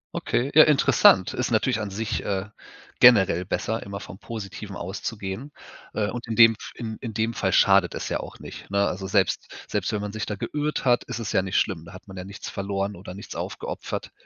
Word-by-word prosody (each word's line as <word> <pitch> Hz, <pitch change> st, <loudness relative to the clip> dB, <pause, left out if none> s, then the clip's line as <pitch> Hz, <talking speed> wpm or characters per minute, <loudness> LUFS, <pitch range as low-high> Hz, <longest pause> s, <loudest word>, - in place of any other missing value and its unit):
Okay. 130 Hz, +4 st, -1 dB
Ja, 155 Hz, -, +9 dB
interessant. 150 Hz, -2 st, +5 dB
Ist -, -, -1 dB
natürlich 110 Hz, -, +1 dB
an 105 Hz, -, -3 dB
sich, 105 Hz, +3 st, -3 dB
äh, 95 Hz, -1 st, -2 dB, 0.5 s
generell 95 Hz, -7 st, +6 dB
besser, 110 Hz, +4 st, -2 dB
immer 100 Hz, 0 st, -6 dB
vom 95 Hz, -, -10 dB
Positiven 105 Hz, -2 st, -7 dB
auszugehen. 100 Hz, +7 st, -5 dB, 0.4 s
Äh, 110 Hz, -, +1 dB
und 120 Hz, 0 st, -6 dB
in 110 Hz, -, -2 dB
dem 115 Hz, -1 st, +8 dB
F 110 Hz, -, -10 dB
in 110 Hz, -2 st, -5 dB
in 115 Hz, -4 st, -6 dB
dem 115 Hz, +1 st, 0 dB
Fall -, -, 0 dB
schadet -, -, +4 dB
es -, -, -4 dB
ja -, -, -1 dB
auch -, -, -8 dB
nicht, -, -, -10 dB
ne? 100 Hz, 0 st, +2 dB
Also 95 Hz, +1 st, -4 dB
selbst 95 Hz, -2 st, +1 dB, 0.2 s
selbst -, -, -1 dB
wenn 105 Hz, -, -2 dB
man 105 Hz, 0 st, -5 dB
sich 110 Hz, 0 st, -4 dB
da 105 Hz, -, -2 dB
geirrt 150 Hz, +6 st, -3 dB
hat, 120 Hz, -1 st, +4 dB
ist -, -, -5 dB
es 115 Hz, -, -4 dB
ja 95 Hz, -, +3 dB
nicht 95 Hz, 0 st, -1 dB
schlimm. 90 Hz, -6 st, 0 dB
Da 85 Hz, -, -12 dB
hat 95 Hz, -, -13 dB
man 95 Hz, -, -10 dB
ja 90 Hz, -, -6 dB
nichts 100 Hz, +1 st, -8 dB
verloren 100 Hz, 0 st, -3 dB
oder 90 Hz, 0 st, -9 dB
nichts 100 Hz, -, -9 dB
aufgeopfert. -, -, -5 dB
100 Hz, 220 wpm, -25 LUFS, 95-115 Hz, 0.5 s, Ja